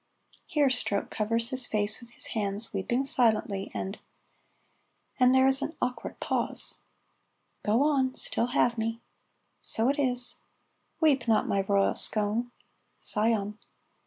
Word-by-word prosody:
Here 290 -3 +2
Stroke 210 -5 -1
covers 230 +2 -1
his 260 -2 +3
face 210 0 0
with 235 - -12
his - - 0
hands, 205 0 -3
weeping 235 +7 -1
silently, 220 -7 +1
and 195 +2 -5 1.2
and 250 0 +5
there 260 0 +5
is 265 0 +5
an 315 - -4
awkward 250 -1 -4
pause. - - -1 0.9
("Go 220 +6 +2
on 270 -3 +1
'Still 235 - +2
have 240 -2 +1
me.'") 225 +1 -2 0.6
("So 225 +3 +2
it 280 - -1
is.") 250 -3 0 0.6
"Weep 280 -7 +2
not, 220 -2 +2
my 200 - +1
royal 195 0 +1
scone 220 +3 0 0.3
" - - -45
("Scion.") 210 -1 0
230 Hz, 135 wpm, -28 LUFS, 210-255 Hz, 1.2 s, and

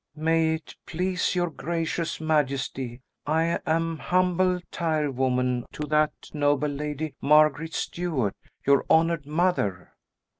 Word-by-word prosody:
"May 160 +1 +2
it 160 -1 -10
please 180 +2 -1
your 175 -2 0
gracious 165 +1 -2
majesty, 135 -5 -1 0.3
I 160 +2 +1
am 165 0 0
humble 180 +3 +2
tirewoman 130 -6 0
to 150 - -4
that 155 0 0
noble 145 -1 +2
lady, 150 +1 -4
Margaret 155 +2 +4
Stuart, 155 - -2 0.3
your 140 0 +4
honoured 165 -2 +3
mother." 150 - 0
155 Hz, 110 wpm, -26 LUFS, 140-165 Hz, 0.3 s, Margaret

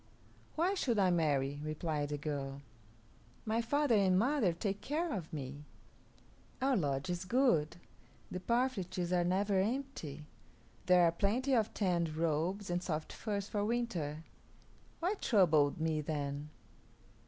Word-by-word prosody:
"Why 350 +5 +2
should 250 - 0
I 190 -3 +4
marry?" 145 -4 +1
replied 155 -1 -2
the 150 - -2
girl. 140 -2 -4 0.8
"My 225 +1 +1
father 285 +2 +1
and 190 -3 +4
mother 240 -3 +3
take 195 +4 -3
care 320 +4 -1
of 180 -7 -5
me. 140 -1 -6 1.0
Our 265 0 +2
lodge 140 - 0
is 175 +1 -3
good; 185 - +2 0.6
the 180 - -3
parfleches 190 -6 -1
are 175 -1 +3
never 190 +2 +1
empty; 195 - -3 0.6
there 180 -1 +6
are 170 - +5
plenty 225 +10 0
of 225 -3 +2
tanned 170 -5 0
robes 170 +5 -1
and 175 0 0
soft 155 -3 -3
furs 205 -2 -3
for 205 -1 -1
winter. 185 -10 -2 0.8
Why 360 +4 +1
trouble 160 - +4
me, 160 -1 0
then?" 145 -1 -3
180 Hz, 135 wpm, -34 LUFS, 155-225 Hz, 1.0 s, there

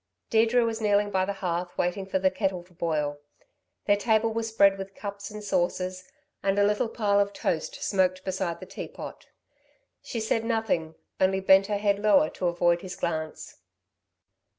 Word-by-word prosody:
Deirdre 230 +2 +4
was 225 0 -2
kneeling 205 -1 +2
by 190 -1 +1
the 200 - -2
hearth 175 +1 -2
waiting 185 +2 -1
for 190 - 0
the 190 0 +2
kettle 185 -2 -1
to 180 0 -23
boil. 150 -4 -1 0.7
Their 205 - +4
table 220 +1 +2
was 225 0 -2
spread 200 -3 +4
with 195 0 -7
cups 200 0 -6
and 210 0 -8
saucers 185 -1 -1 0.3
and 195 0 +1
a 205 - +5
little 210 +2 +1
pile 205 -3 +1
of 200 0 +1
toast - - -2
smoked 185 -2 +1
beside 180 -3 -2
the - - -8
teapot. - - -8 0.7
She 235 - -5
said 225 +1 0
nothing, 220 -9 -1 0.2
only 190 0 +3
bent 190 +1 +5
her 210 - 0
head 200 -1 +1
lower 205 -7 +4
to 180 - -2
avoid 175 0 +2
his 185 -1 -7
glance. 160 -2 -4
195 Hz, 175 wpm, -27 LUFS, 180-210 Hz, 0.7 s, a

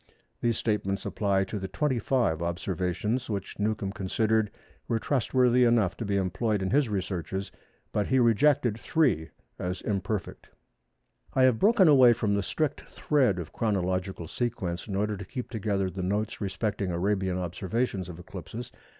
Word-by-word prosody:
These 115 -2 +1
statements 100 -3 -1
apply 100 -2 +1
to 100 +2 -4
the 95 - -4
25 125 - 0
observations 90 +7 -2
which 100 -2 -4
Newcomb 105 -2 -1
considered 110 +3 +1 0.4
were 115 - +1
trustworthy 125 0 +2
enough 115 -6 +3
to 115 - -4
be 100 -1 0
employed 100 +2 0
in 95 - -1
his 140 -2 +3
researches, 95 -1 -3 0.4
but 105 - 0
he 130 - +2
rejected 120 0 +3
three 125 - +1 0.3
as 90 +1 -3
imperfect. 100 0 -3 0.9
I 130 - +4
have 130 -3 +4
broken 205 -3 +5
away 130 -5 +7
from 110 -3 0
the 100 - +1
strict 150 - -1
thread 130 -11 +1
of 85 -3 -6
chronological 95 -4 -1
sequence 95 -6 -3
in 100 - -3
order 105 +1 0
to 100 - -7
keep 125 +6 -6
together 100 -4 0
the 95 - -5
notes 105 +5 -2
respecting 100 0 -2
Arabian 95 +1 0
observations 95 +2 -2
of 85 - -8
eclipses. 100 +7 -8
105 Hz, 150 wpm, -28 LUFS, 95-120 Hz, 0.9 s, away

